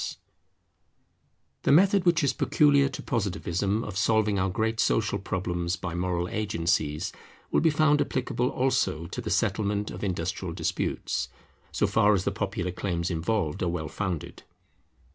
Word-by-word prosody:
Strikes] - - -5 1.4
The - - +2
method 190 +4 +5
which 170 -2 +3
is 140 - +2
peculiar 140 -2 +3
to 135 - -7
Positivism 100 -1 -1
of 100 -2 -4
solving 105 -1 +2
our 95 +1 +1
great 110 +3 -1
social 110 -2 +1
problems 90 -2 -2
by 95 -3 -5
moral 90 0 -1
agencies, 85 -7 -1 0.4
will - - +3
be 165 - +4
found 150 -1 +3
applicable 125 -2 -1
also 110 - 0
to - - -5
the - - -4
settlement 105 0 0
of - - -7
industrial 90 -1 -3
disputes, - - -2 0.4
so - - +1
far 105 +1 +4
as 95 - 0
the - - 0
popular 95 -2 -2
claims 90 -1 -2
involved 85 -1 -1
are 90 - +1
well 85 -2 -3
founded. 85 -4 -4
100 Hz, 150 wpm, -27 LUFS, 90-115 Hz, 1.4 s, method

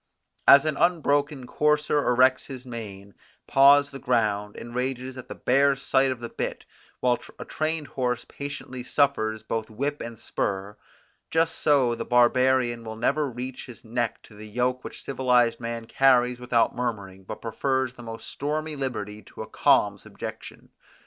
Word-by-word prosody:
As 140 +1 +9
an 155 -2 -1
unbroken 150 -5 +1
courser 150 +2 +1
erects 130 +1 +4
his 130 -2 -8
mane, 100 -5 -8 0.3
paws 140 +1 +6
the 135 - -8
ground, 105 -5 0
and 120 - -9
rages 130 +1 -3
at 130 - -9
the - - -7
bare 140 +2 +3
sight 135 0 +2
of 130 -2 -3
the 120 - -4
bit, - - -4 0.4
while 125 -1 +2 0.2
a - - -7
trained 155 0 -2
horse 125 -3 -2
patiently 140 -3 -7
suffers 110 -6 +1
both 110 0 -3
whip 140 +7 -3
and 115 -1 -7
spur, 100 +1 -3 0.5
just 165 0 +2
so 135 -5 +3
the - - -4
barbarian 125 -1 +3
will 110 -1 -6
never 140 +6 0
reach 125 +2 -7
his 120 -2 -12
neck 120 0 -2
to - - -16
the 105 +1 -10
yoke 125 +3 -1
which - - -9
civilized 125 -3 +2
man 115 -1 -5
carries 125 -1 +3
without 120 -2 +1
murmuring 100 -6 -4
but 105 +3 -7
prefers 130 +2 -1
the 120 - -12
most 115 -1 -8
stormy 155 +2 -3
liberty 110 -6 -4
to - - -9
a - - -11
calm - - +3
subjection. - - -9
125 Hz, 160 wpm, -26 LUFS, 115-140 Hz, 0.5 s, As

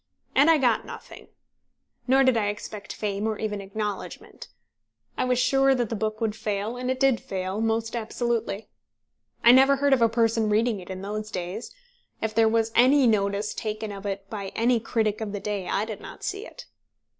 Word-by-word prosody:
And 285 +4 +5
I 325 - +6
got 245 -6 +2
nothing. - - -11 0.8
Nor 265 +2 +5
did 260 -2 +4
I 215 -2 +1
expect 205 0 -6
fame, 205 0 -2
or 220 -1 -2
even 210 -2 -3
acknowledgment. 205 +1 -6 0.7
I - - 0
was 250 -1 +1
sure 270 +1 +3
that 240 -4 -1
the 230 - -2
book 215 0 -2
would 220 -2 -1
fail, 210 +2 -3
and 250 +1 -4
it 260 0 -1
did 270 -3 +3
fail 190 +2 -3
most 225 +1 -1
absolutely. 230 -2 -2 0.8
I 235 - +9
never 265 +2 +6
heard 280 0 +2
of 260 - +3
a 230 - +5
person 225 -1 +1
reading 220 0 +1
it 180 - -12
in 185 0 -6
those 210 +1 -4
days. 185 +5 -5 0.5
If 220 -1 -2
there 225 0 +4
was 225 0 +1
any 260 +3 +5
notice 205 -1 +1
taken 215 -1 -4
of 200 0 -6
it 195 0 -4
by 200 -2 -5
any 235 +1 +2
critic 220 -1 -1
of 210 -2 -4
the 205 - -3
day, 200 -2 -3
I 205 - 0
did 220 -2 -7
not - - -11
see 400 +4 -4
it. - - -12
220 Hz, 195 wpm, -26 LUFS, 205-245 Hz, 0.8 s, I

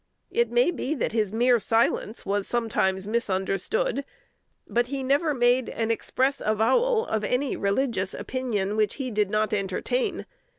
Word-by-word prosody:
It 475 +1 +1
may 485 -7 +3
be 310 -3 -3
that 255 - -1
his 215 -3 0
mere 240 +2 +3
silence 225 0 0
was 200 0 0
sometimes 200 -5 0
misunderstood; 235 - 0 0.6
but 240 +1 +1
he 270 0 -4
never 285 +4 +2
made 245 -1 +2
an 225 0 -1
express 265 +4 0
avowal 260 - +2
of 220 -1 -2
any 250 +5 0
religious 200 -1 -1
opinion 215 -6 -2
which 215 -2 +1
he 260 -3 -4
did 210 -2 +1
not 215 +1 0
entertain. 210 - -1
235 Hz, 145 wpm, -26 LUFS, 210-270 Hz, 0.6 s, may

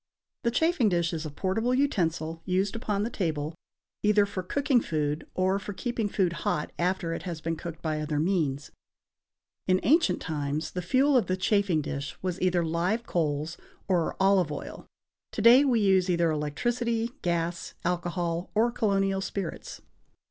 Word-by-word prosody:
The 235 - +3
chafing 275 -2 +2
dish 170 -2 0
is 160 -1 -3
a - - -6
portable 210 - 0
utensil 165 - 0
used 190 +3 0
upon 210 -3 -1
the 230 - -3
table, 155 -6 -2 0.5
either 210 -1 +4
for 200 -2 -4
cooking 270 +6 +1
food 150 -3 -2
or 190 +1 +2
for 200 +1 -6
keeping 225 +2 -2
food 185 -4 +1
hot 150 - -1
after 175 -1 0
it - - -4
has 170 -4 -5
been 165 +1 -2
cooked 170 0 -8
by 155 -1 -1
other 150 -1 -1
means. 155 -5 0 1.0
In 185 0 +4
ancient 315 - +3
times, 150 0 -3
the 180 - -3
fuel 270 +9 +3
of 235 -8 +3
the 185 - 0
chafing 190 -5 +2
dish 140 0 -5
was 185 -1 -2
either 180 -2 +2
live 180 +8 0
coals 155 -2 -1 0.3
or 180 -4 +1
olive 190 -4 +3
oil; 145 - -7 0.5
to - - -2
day 245 +4 +8
we 250 -5 +3
use 190 -3 +3
either 170 -2 +2
electricity, 230 +10 -1
gas, 170 0 -2
alcohol 175 0 -1
or 230 +3 +3
colonial 195 -4 +1
spirits. 190 -2 -5
185 Hz, 165 wpm, -28 LUFS, 165-210 Hz, 1.0 s, day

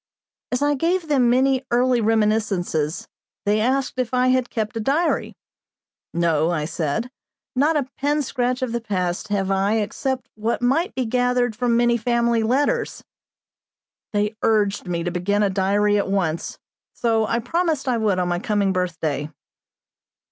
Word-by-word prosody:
As 250 +3 0
I 290 0 +3
gave 335 +3 0
them 260 -5 +3
many 260 +1 +3
early 245 0 +2
reminiscences, 210 -8 0 0.4
they 205 +1 +2
asked 260 +3 0
if 255 0 -1
I 250 0 +3
had 255 -1 +1
kept 220 0 -3
a - - -2
diary. 290 +10 0 0.8
"No," 165 -2 +1
I 160 -4 -1
said, 170 - -2 0.4
"not 300 +4 +3
a 275 -3 -1
pen 290 +2 +1
scratch 250 0 -1
of 250 - -2
the 235 0 -2
past 185 -5 -2
have 195 -2 -1
I 195 +2 +2
except 250 +4 -2
what 220 +2 -2
might 275 - +1
be 255 - -1
gathered 245 0 +1
from 240 0 +1
many 240 0 +3
family 235 0 +1
letters." 255 +6 0 1.1
They 210 0 0
urged 210 -3 +1
me 170 -1 -2
to 175 - -2
begin 200 +4 0
a 200 - +1
diary 205 +2 +2
at 200 - -2
once; 175 -5 -1 0.4
so 225 -2 +1
I - - 0
promised 305 +3 -1
I 245 -2 +1
would 210 -4 +1
on 180 -1 0
my 175 0 0
coming 200 -1 0
birthday. 160 -5 -2
225 Hz, 160 wpm, -22 LUFS, 195-255 Hz, 1.1 s, I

